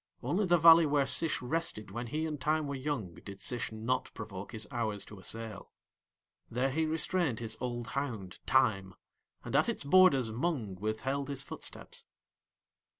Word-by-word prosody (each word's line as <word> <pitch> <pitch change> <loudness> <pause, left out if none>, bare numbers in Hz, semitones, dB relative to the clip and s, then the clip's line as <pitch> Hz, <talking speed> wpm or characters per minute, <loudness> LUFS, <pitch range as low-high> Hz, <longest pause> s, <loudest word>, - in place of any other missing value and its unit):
Only 195 +2 +1
the 175 0 +5
valley 165 0 +8
where 145 -1 +3
Sish 155 +1 +1
rested 135 -6 -2
when 120 +1 -4
he 155 +6 -2
and 150 -3 -4
Time 155 0 +1
were 140 - -3
young 130 - -3
did 100 -1 -9
Sish 120 +5 -3
not 110 +4 -1
provoke 100 -3 -7
his 110 -2 -5
hours 110 -4 -2
to 105 - -11
assail. 110 +1 -6 0.8
There 130 +3 0
he 160 +3 +1
restrained 160 -4 0
his 110 -1 -4
old 120 -1 -3
hound 115 -10 -4
Time, 95 -1 +2 0.5
and - - -4
at - - +4
its - - -2
borders 140 -7 +5
Mung 125 - -1
withheld 110 +8 -2
his 140 -1 -3
footsteps. - - -9
125 Hz, 160 wpm, -32 LUFS, 110-150 Hz, 0.8 s, valley